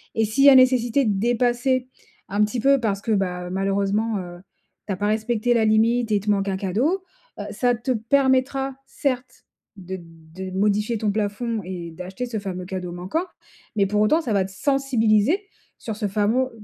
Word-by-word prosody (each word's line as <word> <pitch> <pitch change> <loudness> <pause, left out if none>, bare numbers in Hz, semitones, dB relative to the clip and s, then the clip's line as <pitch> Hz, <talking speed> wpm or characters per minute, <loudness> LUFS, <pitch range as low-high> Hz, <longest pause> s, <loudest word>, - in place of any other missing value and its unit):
Et 225 - +2
s'il 220 +6 +1
y - - +11
a 275 - +8
nécessité 255 0 +4
de 205 -3 +1
dépasser, 245 +3 +1 0.5
un 205 +1 +3
petit 215 +4 -4
peu, 275 +2 +4
parce 205 -4 -1
que, 225 - -3
bah, 180 -3 -1
heu, - - -7
malheureusement, 200 +3 0
heu, 175 -1 -8 0.5
tu 200 - -1
as - - -5
pas 205 - -1
respecté 220 +2 +1
la 230 -2 +2
limite 225 +2 +2
et 205 - +3
tu 210 - -4
manques 200 -1 0
un 190 - -1
cadeau, 245 - 0 0.4
heu, - - -3
ça 245 -1 +1
te 240 +3 -3
permettra, 265 +3 +1
certes, 255 -2 -3 0.3
de 190 0 -6
de 165 +3 -10
modifier 210 +4 +1
ton 210 -2 0
plafond 215 +2 -2
et 175 -2 -6
d'acheter 185 +8 -6
ce 225 -3 -3
fameux 185 -2 -5
cadeau 180 -1 -5
manquant, 185 - -2 0.5
mais 200 - +4
pour 210 +1 +1
autant 305 +11 +3
ça 250 - -4
va 195 -2 +2
te 190 - -10
sensibiliser 270 - +2 0.4
sur, 220 - -5
ce 210 - -1
famo 215 +6 +1
215 Hz, 190 wpm, -23 LUFS, 195-245 Hz, 0.5 s, y